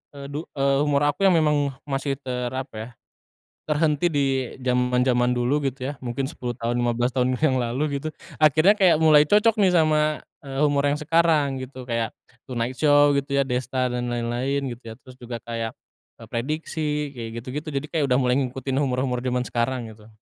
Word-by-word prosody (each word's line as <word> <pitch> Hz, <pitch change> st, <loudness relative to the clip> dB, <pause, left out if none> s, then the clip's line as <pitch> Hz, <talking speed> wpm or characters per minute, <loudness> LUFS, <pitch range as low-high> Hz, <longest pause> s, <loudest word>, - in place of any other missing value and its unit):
eee, 140 Hz, 0 st, -8 dB
du 150 Hz, +3 st, -4 dB
eee, 140 Hz, -1 st, +2 dB
humor 145 Hz, -1 st, +2 dB
aku 195 Hz, -, -5 dB
yang 185 Hz, -, +5 dB
memang 150 Hz, -2 st, +2 dB, 0.2 s
masih 135 Hz, 0 st, -1 dB
ter 125 Hz, -3 st, -3 dB
apa 130 Hz, -1 st, -5 dB
ya, 110 Hz, +2 st, -6 dB, 0.8 s
terhenti 150 Hz, +2 st, +2 dB
di 145 Hz, -2 st, +1 dB, 0.4 s
zaman-zaman 125 Hz, 0 st, +2 dB
dulu 135 Hz, +5 st, +1 dB
gitu 130 Hz, 0 st, -3 dB
ya, -, -, -11 dB
mungkin 125 Hz, +2 st, -2 dB
10 125 Hz, -3 st, -5 dB
tahun, 115 Hz, +1 st, -1 dB
15 120 Hz, +1 st, +1 dB
tahun 130 Hz, 0 st, +1 dB
yang 155 Hz, -4 st, +3 dB
lalu 140 Hz, +4 st, -1 dB
gitu, 155 Hz, -, -2 dB, 0.3 s
akhirnya 155 Hz, +7 st, +6 dB
kayak 180 Hz, -6 st, +5 dB
mulai 155 Hz, -2 st, +7 dB
cocok 210 Hz, +2 st, +5 dB
nih 185 Hz, -2 st, +4 dB
sama, 155 Hz, -1 st, +2 dB, 0.2 s
eee, 135 Hz, -1 st, -6 dB
humor 145 Hz, -1 st, +2 dB
yang 145 Hz, -, -1 dB
sekarang 155 Hz, -4 st, +2 dB
gitu. 130 Hz, -1 st, -9 dB
Kayak 115 Hz, -1 st, -1 dB, 0.4 s
Tonight 120 Hz, 0 st, -2 dB
Show 145 Hz, -1 st, +5 dB
gitu 140 Hz, 0 st, -2 dB
ya, 140 Hz, -, +3 dB
Desta 130 Hz, 0 st, -1 dB
dan 120 Hz, 0 st, -2 dB
lain-lain 125 Hz, +4 st, -1 dB
gitu 120 Hz, +1 st, -12 dB
ya. -, -, -9 dB
Terus 130 Hz, -1 st, -15 dB
juga 120 Hz, -1 st, -6 dB
kayak, 115 Hz, -1 st, -4 dB, 0.5 s
eee, 115 Hz, -, -10 dB
Prediksi, 150 Hz, +3 st, -2 dB
kayak 115 Hz, -2 st, -6 dB
gitu-gitu. 145 Hz, +4 st, -5 dB
Jadi 140 Hz, +2 st, -2 dB
kayak 160 Hz, -3 st, +1 dB
udah 125 Hz, -, +3 dB
mulai 125 Hz, 0 st, +2 dB
ngikutin 130 Hz, 0 st, -3 dB
humor-humor 130 Hz, -2 st, 0 dB
zaman 125 Hz, 0 st, 0 dB
sekarang 120 Hz, -1 st, -2 dB
gitu. 105 Hz, 0 st, -17 dB
135 Hz, 185 wpm, -24 LUFS, 125-150 Hz, 0.8 s, mulai